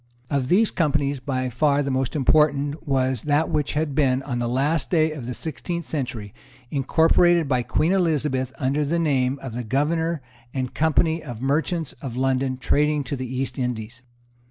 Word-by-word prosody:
Of 140 -3 0
these 205 - +4
companies 140 -4 0
by 130 0 -2
far 145 +3 +2
the 140 - -2
most 130 +1 -1
important 145 +1 +2
was 130 -3 +1
that 150 +3 +1
which 150 -2 0
had 150 -1 -1
been, 135 -2 +2
on 125 -3 -3
the 120 -1 -1
last 140 +5 0
day 160 -2 +3
of 140 -6 -7
the 125 - -4
sixteenth 170 +4 -4
century, 125 -9 -4 0.4
incorporated 160 +3 +3
by 130 -2 +1
Queen 155 +7 +1
Elizabeth 150 -8 +1
under 140 +3 0
the 155 +4 0
name 135 -5 +1
of 130 -4 -6
the 120 +1 -4
Governor 155 +5 0 0.3
and 130 -2 -2
Company 160 +1 +2
of 120 -8 -8
Merchants 155 +4 -1
of 125 -4 -6
London 130 0 0
trading 150 +3 +1
to 140 - -4
the 130 -1 -5
East 130 +1 -3
Indies. 120 -1 -4
140 Hz, 175 wpm, -23 LUFS, 130-155 Hz, 0.4 s, these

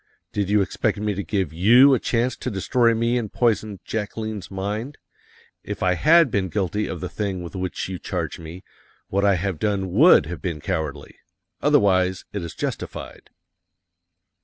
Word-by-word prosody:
"Did 100 -2 -1
you 105 -1 +4
expect - - -1
me 105 0 -1
to 100 - -3
give 95 -4 -2
you 120 - +6
a 130 - +3
chance 120 +1 0
to - - -5
destroy 115 +4 +2
me 115 +2 +1
and 110 -4 -5
poison 110 -4 0
Jacqueline's 110 -2 -4
mind? 105 +8 -4 0.7
If - - -5
I 90 0 +3
had 155 - +5
been 95 -3 0
guilty 105 +1 -1
of - - -6
the - - -3
thing 95 -4 -3
with 85 - -9
which 95 -1 -3
you 95 -1 -5
charge - - -4
me, 85 +3 -9 0.5
what 100 +1 0
I 100 -1 +4
have 90 -2 -3
done 100 -3 -1
would 125 - +6
have 85 +3 -7
been 85 -5 -3
cowardly. 75 -1 -4 0.4
Otherwise, 95 -2 +2
it 100 - -3
is 85 -1 -7
justified." - - -6
100 Hz, 170 wpm, -23 LUFS, 90-110 Hz, 0.7 s, you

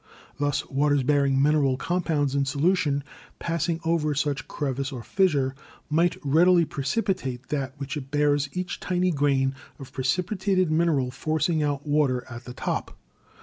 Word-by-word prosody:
Thus 145 -1 0
waters 145 0 +2
bearing 140 0 +2
mineral 140 -2 +3
compounds 160 -4 0
in 140 0 +1
solution, 145 0 +1 0.3
passing 165 0 -1
over 155 -3 +1
such 145 0 -1
crevice 135 -1 -3
or 125 -4 -6
fissure, 145 -9 +1 0.4
might 170 +3 +2
readily 170 +4 +5
precipitate 140 - -2
that 140 -2 -2
which 140 +1 -5
it 135 -3 -6
bears, 145 -1 +2
each 180 0 -4
tiny 180 0 0
grain 135 -3 +1 0.2
of 135 -2 -10
precipitated 185 - 0
mineral 155 -6 +2
forcing 155 +4 0
out 145 -1 -1
water 145 -4 +1
at 120 0 -9
the 125 - -7
top. - - -3
145 Hz, 145 wpm, -25 LUFS, 135-165 Hz, 0.4 s, readily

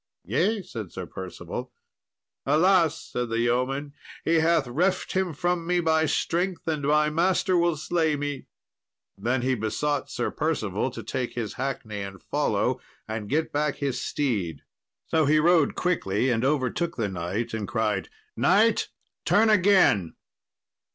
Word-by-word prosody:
"Yea," 190 - +1
said 110 - -7
Sir - - -6
Percival. 95 +6 -7 0.7
"Alas," 165 +2 +3
said 125 -1 -4
the 115 - -1
yeoman, 130 +5 0 0.3
"he 165 0 +3
hath 160 -3 +2
reft 180 +9 0
him 190 -2 0
from 170 +2 -1
me 180 0 +2
by 160 -1 +2
strength, 175 +3 -1
and 155 -2 -1
my 150 +1 +2
master 185 +3 +2
will 170 -2 +2
slay 160 0 +1
me." 145 -1 -4 0.7
Then 120 +5 -1
he 130 +1 +2
besought 130 +6 -1
Sir - - -2
Percival - - -1
to - - -8
take 125 -2 -3
his 115 -4 -3
hackney 125 -6 -4
and 95 -1 -7
follow, - - 0 0.3
and 110 -2 -5
get 160 +2 0
back 150 0 0
his 140 -3 -2
steed. 100 - -2 0.4
So 160 -1 +2
he 150 +2 +4
rode 160 -1 +4
quickly, 130 - 0
and 115 0 0
overtook 150 +5 0
the 110 -4 0
knight, 95 +5 -3
and 110 -3 -3
cried, 110 - -1 0.3
"Knight, 210 +4 +3 0.4
turn 220 +1 +4
again." 185 - +4
145 Hz, 145 wpm, -26 LUFS, 115-170 Hz, 0.7 s, he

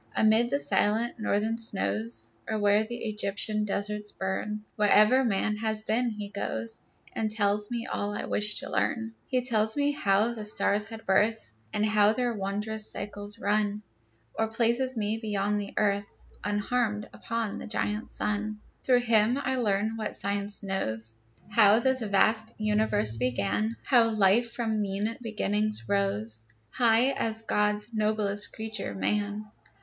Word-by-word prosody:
Amid 220 +2 +4
the 280 - 0
silent 230 0 +1
northern 220 +2 0
snows, 115 - -1 0.2
Or 220 - 0
where 205 +1 +3
Egyptian 215 -2 -1
deserts 210 +1 -2
burn, 210 +2 -3
Wherever 215 +5 +5
man 210 -2 +1
has 215 0 -1
been, 240 +3 +1
he 210 -2 -6
goes, 115 - -4 0.3
And 220 -1 -1
tells 210 -1 0
me 235 -1 -3
all 205 0 -2
I - - -4
wish 210 0 +1
to - - -7
learn. 225 -1 -1
He 250 -1 0
tells 220 -1 +1
me 285 0 +2
how 215 -4 +2
the 220 -2 -6
stars 210 0 +1
had 225 0 -9
birth, 205 - +1 0.2
And 210 - +1
how 210 0 +4
their 245 0 0
wondrous 210 +2 -3
cycles 205 +1 -6
run, 210 0 0 0.5
Or 225 - 0
places 235 +3 +1
me 215 +1 0
beyond 205 -1 0
the 200 - -8
earth, 200 -1 -1 0.2
Unharmed, 210 +1 -1
upon 230 -3 -3
the - - -7
giant 210 0 -2
sun. 210 0 -2 0.2
Through 250 -1 +4
him 230 +1 +4
I 265 -1 -1
learn 215 -1 0
what 215 -1 -4
Science 200 +1 -3
knows, 115 - -2 0.3
How 210 0 +6
this 260 +2 +1
vast 220 +2 +2
universe 210 - +1
began; 110 -3 0
How 235 - +4
life, 215 +2 +3
from 220 -3 -1
mean 205 +3 -2
beginnings, 215 - -1
rose 105 +3 0 0.3
High 235 +2 +4
as 225 -4 -2
God's 210 +1 0
noblest 210 -1 0
creature, 220 0 -4
man. 205 +1 0
210 Hz, 145 wpm, -28 LUFS, 205-225 Hz, 0.5 s, How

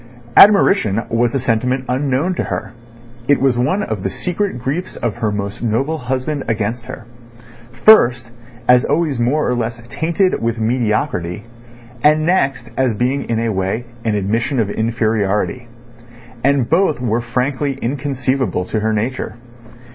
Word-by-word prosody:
Admiration 195 - +5
was 115 +2 +1
a - - +2
sentiment 125 +2 0
unknown 135 +6 0
to - - -2
her 110 +1 -4 0.6
(it 145 - +4
was 135 -2 +2
one 150 +12 0
of - - -4
the - - -2
secret 185 -3 -3
griefs 140 +9 -4
of 120 -3 -3
her 110 -2 -1
most 100 0 -4
noble 135 +8 -1
husband 130 +3 -2
against 115 +1 -2
her)—first, 120 - +1 0.4
as 125 0 +6
always 150 -3 0
more 135 +6 +1
or 125 - +1
less 115 -1 -3
tainted 170 +6 0
with 115 0 -1
mediocrity, 110 - -1 0.6
and 155 +1 +4
next 135 -9 0
as 130 -4 +1
being 125 +5 -1
in 115 - 0
a 115 - 0
way 95 +4 -2 0.2
an 110 -2 0
admission 115 +7 -1
of 105 -3 0
inferiority. 110 +1 -1 0.8
And 135 -3 +2
both 165 -3 +2
were 120 -1 0
frankly 130 +3 -2
inconceivable 130 -6 -1
to 110 - -1
her 110 +1 0
nature. 115 +3 -3
125 Hz, 145 wpm, -18 LUFS, 115-140 Hz, 0.8 s, as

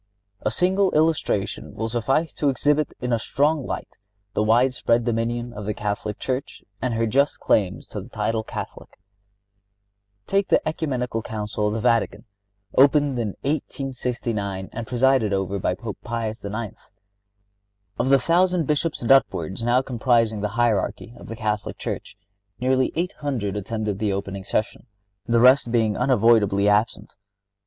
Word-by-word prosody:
A - - 0
single 185 - +2
illustration 155 -10 0
will 110 - -2
suffice 130 +8 0
to 145 - +1
exhibit 145 +3 +1
in 125 -1 -1
a 115 - +2
strong 145 +4 0
light - - -6 0.3
the - - 0
widespread 120 +1 +2
dominion 120 +1 -1
of 105 -2 -7
the 105 - -1
Catholic 105 0 -3
Church 130 +1 -4 0.2
and 125 -3 -1
her 115 0 +1
just 140 +6 +1
claims 95 -2 +1
to 105 - -6
the 110 - -12
title 110 0 -1
of - - -18
Catholic. - - -7 1.3
Take 195 0 +1
the - - +4
Ecumenical 130 -7 -2
Council 105 -1 -3
of 105 - -1
the - - -1
Vatican, 115 +1 +1 0.5
opened 140 -1 +4
in 105 -4 -2
1869 120 -9 -3
and 115 0 -6
presided 125 -4 +2
over 95 0 -1
by 90 - 0
Pope 105 +1 -7
Pius 115 -1 -4
IX. 105 +1 -4 1.2
Of 130 - +1
the 135 - +7
thousand 175 +4 +2
Bishops 150 0 -1
and 115 - +1
upwards 95 -8 +2
now 120 +3 +2
comprising 115 -4 +1
the 105 - -1
hierarchy 115 -1 0
of - - -12
the 115 - -6
Catholic 105 -2 -2
Church, - - -5 0.4
nearly 130 +1 +2
eight 175 +3 -1
hundred 125 -10 -2
attended 105 0 -3
the 105 -2 0
opening 100 -1 -5
session, 110 +5 -2 0.4
the 115 0 +3
rest 125 0 +5
being 110 -3 +2
unavoidably 105 -5 +3
absent. 105 +2 +1
115 Hz, 150 wpm, -23 LUFS, 105-135 Hz, 1.3 s, the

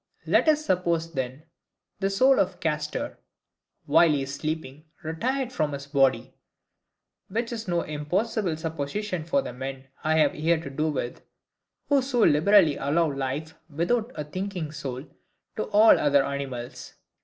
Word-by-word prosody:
Let - - +3
us 305 0 +2
suppose, 170 - 0
then, 130 +1 -4 0.6
the 195 -1 +1
soul 260 +7 +4
of 185 - 0
Castor, 150 -1 -3 0.7
while 170 - +5
he 145 -3 +1
is 135 +1 -6
sleeping, 155 -1 -5 0.2
retired 250 - -2
from 150 -9 -1
his 140 0 -6
body; 135 -3 +1 0.9
which 230 +4 -2
is 225 -2 -5
no 175 -1 +1
impossible 175 +4 -1
supposition 160 +4 -3
for 275 +10 +1
the - - -6
men 135 +1 -7
I 155 +1 +2
have 150 -2 +4
here 160 +2 +1
to 160 -4 -7
do 155 +3 0
with, 130 -4 -4 0.7
who 285 -2 +4
so 250 -2 0
liberally 160 0 +5
allow 155 +2 +1
life, 140 +3 -3 0.2
without 215 - 0
a 150 - -3
thinking 180 0 -4
soul, 140 -3 -6 0.5
to 215 - -2
all 215 +2 +6
other 140 -2 +3
animals. 135 -4 -6
155 Hz, 150 wpm, -26 LUFS, 140-195 Hz, 0.9 s, all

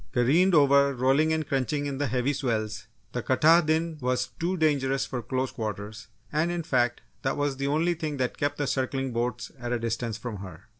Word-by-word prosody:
Careened 155 +9 +4
over, 140 -1 +5
rolling 135 +5 +3
and 160 -2 -1
crunching 145 +1 -1
in 140 -1 -3
the 145 - +1
heavy 125 +4 0
swells, 110 -4 -2 0.2
the 125 - -3
Katahdin 160 +4 +3
was 125 0 0
too 180 +3 0
dangerous 135 -4 +1
for 125 - -4
close 130 +3 -2
quarters, 105 -1 -5 0.3
and 155 +3 +1
in 175 -1 -2
fact, 120 -5 +1 0.2
that 135 - -1
was 145 -2 -1
the 140 0 -1
only 160 +5 +2
thing 155 -3 -4
that 125 -1 -1
kept 145 0 0
the 145 - -1
circling 135 0 -1
boats 120 +1 -2
at 120 0 -4
a 120 - +1
distance 115 -1 -2
from 115 -3 -6
her. 90 -4 -9
135 Hz, 195 wpm, -27 LUFS, 120-150 Hz, 0.3 s, over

